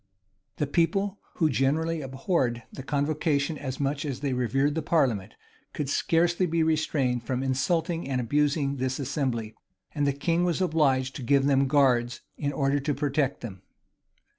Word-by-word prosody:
The 150 - 0
people, 185 +7 0 0.2
who 160 - +2
generally 155 +4 0
abhorred 135 - -1
the - - -7
convocation 145 +2 0
as 130 -3 -5
much 140 0 -1
as 140 -4 -4
they 140 -3 -1
revered 135 +4 +1
the 160 - -1
parliament, 130 - 0 0.4
could 145 -3 -3
scarcely 170 +4 +2
be 165 0 +1
restrained 150 -6 +1
from 125 +2 -2
insulting 165 +4 0
and 130 -2 0
abusing 140 +2 +1
this 130 0 -1
assembly; 130 -6 -2 0.4
and 145 -2 0
the - - +3
king 165 +5 0
was 175 -1 0
obliged 140 -7 +1
to - - -7
give 135 +2 +3
them 135 -1 +3
guards, 125 -4 +2
in 145 -1 -2
order 140 0 +1
to 145 +1 -1
protect 140 -1 -1
them. 100 -6 -8
140 Hz, 160 wpm, -27 LUFS, 130-155 Hz, 0.4 s, the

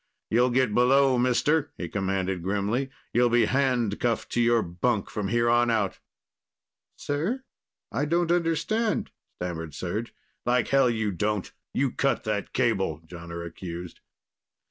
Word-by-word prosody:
"You'll 120 +3 +4
get 125 -3 +2
below, 130 +2 +4
mister," 145 +5 +2
he 85 - -4
commanded 95 -1 -1
grimly. 105 +8 -1 0.2
"You'll 120 +1 +4
be 120 0 +4
handcuffed 120 -4 0
to 120 - +1
your 120 -1 +4
bunk 100 +5 -1
from 105 -2 -2
here 120 +3 +2
on 120 0 +4
out." 105 -4 0 1.0
"Sir?... 175 - -2 0.5
I 140 +5 0
don't 170 +2 +1
understand," 175 +6 0 0.3
stammered 80 -3 -4
Serj. 100 +9 -3 0.3
"Like 120 -1 +1
hell 135 -2 +4
you 110 -3 0
don't. 105 +2 -2 0.2
You 135 -1 +1
cut 135 - 0
that 105 -2 -2
cable," 95 - 0
Jonner 85 0 -7
accused. 85 0 -7
120 Hz, 135 wpm, -27 LUFS, 95-130 Hz, 1.0 s, You'll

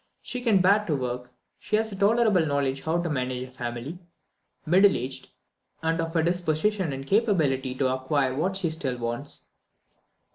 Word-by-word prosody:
She 250 - -4
can 220 -6 +3
bear 200 +3 +4
to 155 - +1
work; 125 -2 -4 0.3
she 210 - -1
has 220 0 0
a - - -5
tolerable 205 -2 +3
knowledge 140 -3 0
how 165 +2 0
to - - -2
manage 130 -4 -2
a 130 - -10
family; 125 +6 -6 0.7
middle 190 +5 +5
aged, 130 +1 -6 0.5
and 165 +1 +1
of 165 +1 -4
a 160 - +3
disposition 175 +2 0
and 135 0 -5
capability 145 - +1
to 130 -1 +1
acquire 130 0 0
what 180 +8 -1
she 175 -5 -1
still 135 -6 -3
wants. 120 +4 -5
155 Hz, 170 wpm, -26 LUFS, 130-190 Hz, 0.7 s, middle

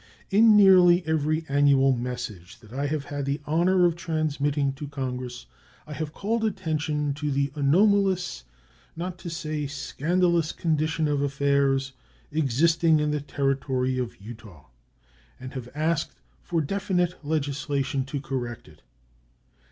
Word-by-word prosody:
In 215 +1 +6
nearly 185 -3 +6
every 155 0 0
annual 140 -1 +4
message 120 -7 -6
that 110 0 -15
I 140 +2 -1
have 145 -1 -2
had 145 -1 -4
the 140 +2 -1
honor 175 +4 +3
of 170 -2 +2
transmitting 145 -4 -1
to 145 +2 -7
Congress 125 -3 -5 0.4
I 150 - -8
have 155 0 -4
called 220 +7 -2
attention 155 -7 -1
to 145 +1 -3
the 140 0 0
anomalous, 185 - +2 0.5
not 180 +2 -5
to 175 - -6
say 155 -3 -3
scandalous, 170 +3 0
condition 155 -1 0
of 145 -1 0
affairs 140 -1 +1 0.4
existing 160 +3 +2
in 150 0 0
the 150 -1 -1
Territory 135 -2 -1
of 125 -2 -5
Utah, 100 - -12 0.7
and 130 0 -8
have 125 -2 -6
asked 155 +1 0 0.3
for 170 -2 -1
definite 180 0 -1
legislation 140 -2 -1
to 140 +1 -4
correct 125 -4 -5
it. 75 0 -18
145 Hz, 135 wpm, -26 LUFS, 135-165 Hz, 0.7 s, In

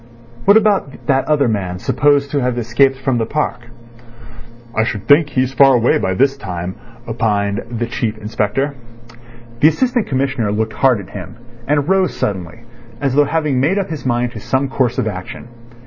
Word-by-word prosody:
"What 200 +2 +7
about 205 -10 0
that 135 -2 +2
other 145 -3 +2
man 95 -5 -2
supposed 140 +7 +1
to 145 - 0
have 125 -1 -1
escaped 120 +3 +2
from 130 -2 -1
the 115 - -1
park?" 130 -5 -3 1.1
"I 110 - +2
should 110 -3 -4
think 150 +1 +5
he's 130 -1 0
far 135 -1 +6
away 120 0 +3
by 95 - -1
this 135 +5 +2
time," 90 -6 -5 0.3
opined 105 -3 -1
the 120 0 -2
Chief 115 -2 -3
Inspector. 110 +6 -2 0.9
The 150 - +6
Assistant 245 - +1
Commissioner 130 -5 -1
looked 110 +1 -1
hard 130 -5 +3
at 90 - -13
him, 100 +2 -8 0.3
and 145 0 +1
rose 190 0 +2
suddenly, 95 +2 -4 0.4
as 135 -2 -1
though 145 +1 +4
having 150 -3 0
made 155 +9 +1
up 195 -4 -2
his 155 - -5
mind 120 -1 0
to - - -8
some 135 +1 -1
course 130 -3 0
of - - 0
action. 95 +3 -7
130 Hz, 180 wpm, -17 LUFS, 110-145 Hz, 1.1 s, What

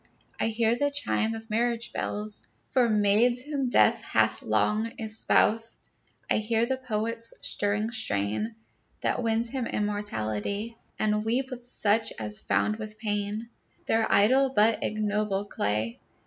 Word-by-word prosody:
I - - +1
hear 225 +1 +1
the 285 +4 +1
chime 255 -6 0
of 225 0 -10
marriage 235 +1 0
bells 210 0 -3 0.3
For 250 -3 +3
maids 215 +4 +3
whom 280 -3 -2
death - - +4
hath - - +1
long 220 +2 +1
espoused. 225 0 +1 0.4
I - - +2
hear 225 +1 +1
the 260 +2 -1
poet's 230 -2 -3
stirring 205 +2 0
strain, 215 - -1 0.5
That - - 0
wins 230 0 +1
him 255 -2 -3
immortality, 205 - -2 0.2
And 210 0 +1
weep 255 +4 0
with 245 -1 -8
such 220 -2 +2
as 105 -1 -3
found 215 0 0
with 215 -1 -8
pain 210 +1 -1 0.4
Their 225 0 +1
idol 260 +7 +4
but 220 -2 +3
ignoble 210 -1 -1
clay. 110 - -1
220 Hz, 135 wpm, -27 LUFS, 210-235 Hz, 0.5 s, death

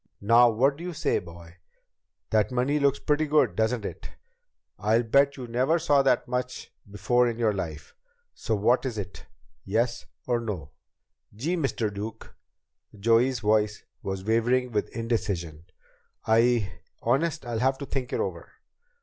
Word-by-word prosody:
Now 120 +4 +6
what 135 +5 +2
do 170 - -9
you 180 0 -4
say, - - 0
boy? 85 0 -13 0.7
That 110 +2 +2
money 130 +4 +1
looks 140 -1 +2
pretty 150 +2 0
good, 150 +1 +3
doesn't 110 0 0
it? - - -7 0.7
I'll 110 +3 +2
bet 140 +4 +3
you 130 - -6
never 125 +7 +1
saw 145 -4 +3
that 135 - +2
much 125 0 -4 0.2
before 120 +5 +2
in 115 - -4
your 115 -3 +2
life. 80 -6 -6 0.4
So 110 - -2
what 120 +5 +2
is 125 -5 -3
it? 100 -2 -7 0.4
Yes 115 +4 -1 0.2
or 120 -1 +1
no?" 95 -11 -5 0.6
"Gee, 155 +12 -1
Mr. 125 - -1
Duke!" 105 +2 -7 0.7
Joey's 115 +3 +3
voice 105 -1 +1 0.2
was 95 -1 -4
wavering 120 +3 +1
with 105 -2 -1
indecision. 95 -9 -3 0.6
"I 110 -4 +2 0.2
Honest, 160 +1 0
I'll 120 -2 -3
have 130 +2 +2
to 140 - -6
think 130 -2 -4
it - - -1
over." - - -4
115 Hz, 150 wpm, -26 LUFS, 105-130 Hz, 0.7 s, Now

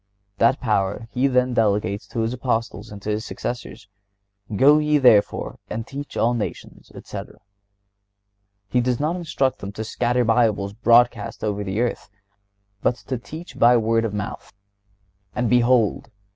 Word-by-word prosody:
That 115 +4 +4
power 105 -1 -1
He 130 +2 +2
then 125 -1 +2
delegates 105 -3 0
to 115 - -3
His 115 +2 -1
Apostles 115 -3 -2
and 100 - -8
to - - -4
their 105 0 0
successors: 120 -1 -6 0.7
"Go 145 +7 +6
ye, 150 0 +2
therefore, 120 -7 +3
and 110 +1 -4
teach 140 +2 -7
all 120 +2 +2
nations," 115 -3 -6
etc. - - -8 1.3
He 125 +5 +1
does 125 0 0
not 155 +4 0
instruct 155 -7 -1
them 95 - -6
to 110 - -5
scatter 120 +2 0
Bibles 110 -4 +2
broadcast 115 0 +2
over 105 -1 -1
the 95 +2 -3
earth, 120 - -2 0.7
but 120 - +2
to 130 0 -5
teach 160 +8 -10
by 120 +1 +6
word 115 0 +1
of 115 - -1
mouth. 105 0 -6 0.8
"And 125 -1 0
behold!" 120 -2 +2
120 Hz, 150 wpm, -22 LUFS, 105-125 Hz, 1.3 s, Go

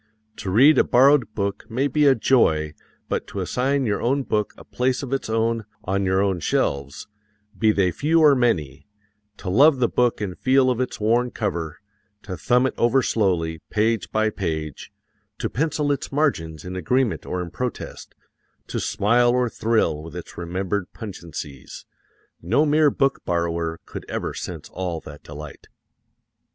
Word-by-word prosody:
To 95 - -5
read 135 +11 +6
a - - +6
borrowed 135 -1 +4
book 100 0 -3
may 130 +5 0
be 145 +2 +3
a 135 - +6
joy, 80 - +2 0.3
but - - -2
to - - -6
assign 135 +2 0
your 105 -3 -1
own 135 +4 +1
book 105 -4 -1
a - - -12
place 130 +2 -1
of 135 0 -4
its 135 - -2
own 115 0 0 0.2
on 95 +1 -1
your 95 +1 +2
own 95 -3 0
shelves 70 -3 -1 0.5
be 110 -1 +3
they 95 -4 +2
few 160 - +2
or 150 -3 +7
many 80 - 0 0.5
to - - -10
love 135 +10 +5
the 125 -2 +2
book 125 0 +1
and 100 -4 -4
feel 130 0 +3
of 125 0 -1
its 125 - -3
worn 120 +3 +2
cover, 85 -8 -3 0.5
to 95 -3 -5
thumb 125 +6 +2
it 130 - 0
over 125 +3 +3
slowly, 85 -8 0
page 110 +1 0
by 110 0 +1
page, 80 -3 -4 0.5
to - - -3
pencil 150 +1 0
its 140 - -3
margins 85 - -1
in 90 +1 -6
agreement 105 0 0
or 90 - -2
in 90 -2 -5
protest, 125 +5 -6 0.5
to - - -2
smile 120 +4 +2
or 125 0 +2
thrill 110 -10 0
with 80 +2 -10
its 90 - -8
remembered 90 +3 -3
pungencies 85 - -8 0.6
no 120 - +2
mere 150 0 +4
book 135 -1 0
borrower 85 -1 -1
could - - -8
ever - - -3
sense - - -6
all 90 -3 -4
that 75 -1 -12
delight. 75 0 -10
110 Hz, 165 wpm, -23 LUFS, 85-130 Hz, 0.6 s, or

